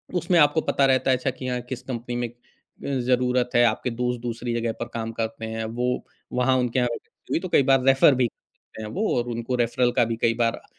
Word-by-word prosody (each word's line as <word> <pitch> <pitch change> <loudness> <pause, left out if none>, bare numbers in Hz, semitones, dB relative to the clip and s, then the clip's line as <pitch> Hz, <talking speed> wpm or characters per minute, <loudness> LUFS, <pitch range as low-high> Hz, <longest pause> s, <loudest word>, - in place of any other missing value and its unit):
उसमें 175 0 +2
आपको 150 +1 +4
पता 140 - +3
रहता 130 0 +3
है 130 - +3
अच्छा 130 +2 -1
कि 130 0 -7
हाँ, 125 -1 -2
किस 125 0 -7
कंपनी 120 -1 -5
में 120 0 -1
अ, - - -17 0.8
ज़रूरत 125 0 +2
है 120 - +6
आपके 115 +2 0
दोस्त 125 0 -2
दूसरी 120 0 -3
जगह 115 0 -1
पर 120 - -3
काम 115 -1 -3
करते 115 0 -4
हैं 110 0 -4
वो 125 - +1 0.5
वहाँ 130 +1 +3
उनके 125 0 0
यहाँ 125 -1 +1
वेकन्सी - - -9
हुई - - +2
तो 185 0 -6
कई 140 - +4
बार 135 -1 +4
रेफ़र 135 +1 +6
भी - - +5
देते 110 - -16
हैं 105 - -6
वो 215 +4 0
और 120 0 -1
उनको 120 +2 -2
रेफ़रल 120 +1 +1
का 120 - +5
भी 115 0 -2
कई 115 - +3
बार 115 - +1
अ, - - -15
125 Hz, 245 wpm, -24 LUFS, 115-130 Hz, 0.8 s, है